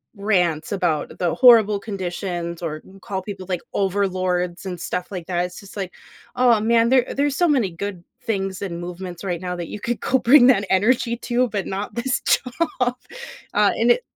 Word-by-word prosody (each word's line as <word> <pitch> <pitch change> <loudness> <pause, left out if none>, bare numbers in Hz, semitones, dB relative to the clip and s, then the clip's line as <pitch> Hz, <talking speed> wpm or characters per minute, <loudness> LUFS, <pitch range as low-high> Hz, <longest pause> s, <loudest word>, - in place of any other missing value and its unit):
rants 180 -6 0
about 175 -6 -1
the 175 -2 +1
horrible 225 -5 +6
conditions 180 -4 -4
or 155 -2 -4
n 195 +1 -16
call 190 0 -4
people 190 -1 -7
like, 180 -2 -1
overlords 185 -2 -1
and 180 -2 -5
stuff 180 +2 -4
like 180 -4 -5
that, 175 -1 0
it's 180 0 -8
just 200 0 -13
like, 190 -3 -4 0.4
"Oh 245 -3 +4
man, 230 +1 +3
there 255 -1 +3
there's 285 0 +1
so 350 +3 +3
many 255 - +2
good 180 +1 -6 0.2
things 195 -3 -2
and 175 -4 -4
movements 175 0 -7
right 175 -3 -3
now 180 -1 -3
that 175 -1 -5
you 210 - -7
could 240 -1 -2
go 260 - +2
bring 250 +1 +7
that 225 -6 +4
energy 235 +4 +2
to, 245 +1 0
but 205 -2 -3
not 195 +2 -4
this 245 +1 -1
job. 255 +6 +1 0.9
Uh, - - +4
and - - +3
it - - +2
195 Hz, 190 wpm, -22 LUFS, 180-235 Hz, 0.9 s, bring